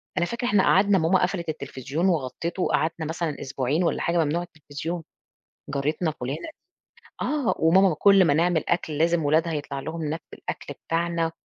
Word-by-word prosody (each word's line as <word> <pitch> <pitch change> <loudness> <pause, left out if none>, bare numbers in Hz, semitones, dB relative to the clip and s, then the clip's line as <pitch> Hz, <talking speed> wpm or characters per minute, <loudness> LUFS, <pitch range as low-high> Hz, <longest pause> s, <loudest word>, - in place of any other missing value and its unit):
فأنا 175 - +2
فاكرة 235 +6 -3
إحنا 205 -4 +4
قعَدنا 200 +1 +4
ماما 180 +2 +3
قفلِت 180 -2 -1
التليفزيون 140 +2 -3
وغطِّته 165 +3 -2
وقعَدنا 160 +2 0
مثلًا 160 -1 -3
أسبوعين 135 +4 -1
والّا 170 - 0
حاجة 170 +1 0
ممنوع 160 +4 -1
التليفزيون، 160 +1 -6 0.7
جارتنا 150 +4 -1
فلانة 140 +3 -5 0.7
آه، 290 -5 +1
وماما 185 +3 +5
كلّ 195 +2 +6
ما 145 - +4
نعمل 170 +1 +2
أكْل 160 -3 0
لازم 165 0 +2
ولادها 160 +3 +2
يطلَع 145 -2 -4
لهم 160 +4 -5
ناب 160 +2 -2
من - - -10
الأكل - - -6
بتاعنا 165 0 0
165 Hz, 165 wpm, -25 LUFS, 150-175 Hz, 0.7 s, كلّ